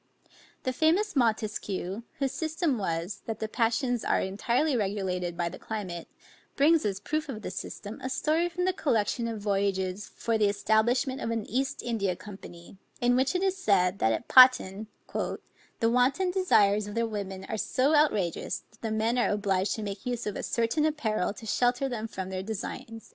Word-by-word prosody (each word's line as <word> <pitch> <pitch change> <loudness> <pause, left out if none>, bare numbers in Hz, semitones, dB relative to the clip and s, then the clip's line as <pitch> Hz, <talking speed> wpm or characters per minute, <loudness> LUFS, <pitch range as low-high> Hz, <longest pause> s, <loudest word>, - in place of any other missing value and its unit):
The 255 - -1
famous 345 +8 +2
Montesquieu, 215 -5 -1 0.2
whose 275 -3 0
system 315 -3 -1
was, 180 +1 -3
that 225 - -3
the 220 - -3
passions 235 +2 0
are - - +2
entirely 235 +9 0
regulated 190 -5 -2
by 175 -1 0
the 170 - -7
climate, 185 -6 -5 0.5
brings 305 0 +4
as 200 -2 0
a 200 - -14
proof 310 0 -2
of 220 -5 -6
this - - -5
system, 205 +2 -7
a 260 - -2
story 315 +6 +1
from 360 +1 -2
the 375 - +2
collection 235 - 0
of 225 -2 -4
voyages 195 -1 -1
for 230 -1 0
the 210 -1 +4
establishment 235 +6 +1
of - - -2
an 225 -2 -2
East 265 +3 -2
India 205 -6 -1
Company, 190 -2 -11 0.2
in 245 0 +3
which 260 +6 +2
it 365 - +1
is 385 -1 +2
said, 195 - +2
that 110 - +3
at 110 - -2
Patan, 220 -5 +6 0.3
"the - - -1 0.6
wanton 265 +10 +2
desires 210 - +3
of 205 - -7
the 230 0 +1
women 195 -3 -5
are - - -4
so 260 +7 +1
outrageous, 215 - +1
that 220 - -24
the 225 - -2
men 220 +3 +1
are - - +2
obliged 200 -2 0
to 220 - -5
make 200 -1 -5
use 245 -1 -2
of 210 - -3
a - - -3
certain 235 +6 0
apparel 240 -12 0
to 215 +2 -10
shelter 245 +4 +1
them 225 -4 -4
from 190 -3 -6
their 185 0 -3
designs." 220 +2 -6
220 Hz, 185 wpm, -28 LUFS, 200-260 Hz, 0.6 s, Patan